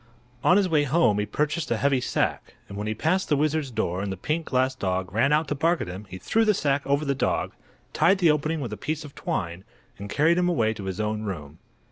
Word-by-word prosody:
On 180 - +5
his 200 -2 +3
way 155 -4 +2
home 135 -8 +3
he 105 - -1
purchased 150 +2 -1
a - - +1
heavy 140 -2 +2
sack, - - -2
and 100 - -9
when 105 +1 -4
he 110 - -1
passed 180 - 0
the 150 - +4
wizard's 155 -1 0
door 95 -6 -2
and 100 -1 -3
the 95 - -5
pink 155 - -2
glass 130 0 +1
dog 95 -6 -2
ran 115 +6 +2
out 155 +1 +2
to - - +1
bark 165 +4 +1
at - - -4
him 95 +4 -8
he 95 - -7
threw 225 - +1
the 210 -2 +3
sack 145 -3 +1
over 140 +2 +1
the 140 - +1
dog, 135 - -1 0.4
tied 195 +3 +4
the 175 -4 +4
opening 155 +1 -1
with 120 -5 -4
a - - -5
piece 155 - -3
of 140 - -11
twine, 85 -2 -3 0.4
and 100 0 -7
carried 165 - +3
him 180 0 +2
away 115 -10 +1
to 100 -3 -8
his 95 +1 -4
own 105 0 -1
room. 80 -7 -6
140 Hz, 250 wpm, -25 LUFS, 105-155 Hz, 0.4 s, On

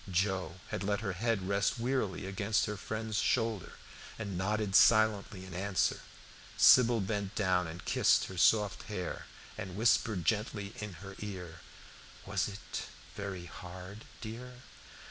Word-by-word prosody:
Joe 95 -1 0
had - - -3
let 105 +1 0
her 100 -4 -2
head 100 -1 -1
rest 100 +2 +1
wearily 115 -6 -1
against 100 +2 0
her 105 - -3
friend's 110 +2 -3
shoulder, 110 -4 0 0.4
and 100 -4 -4
nodded 100 +2 0
silently 110 -4 +4
in 95 - -10
answer. 95 +1 0 0.6
Sybil 120 -3 +7
bent 100 0 -2
down 90 -4 +2
and 85 +2 -8
kissed - - +4
her 95 - -8
soft 105 +2 +4
hair, 90 -4 -4 0.3
and 95 -2 -5
whispered 110 -4 +2
gently 105 0 -1
in 105 -2 -5
her 95 - -8
ear, 90 -5 -6 0.7
"Was 95 -2 0
it 100 -1 -6 0.3
very 100 -3 -5
hard, 90 +4 -9 0.2
dear?" 125 +2 -8
100 Hz, 140 wpm, -32 LUFS, 95-110 Hz, 0.7 s, Sybil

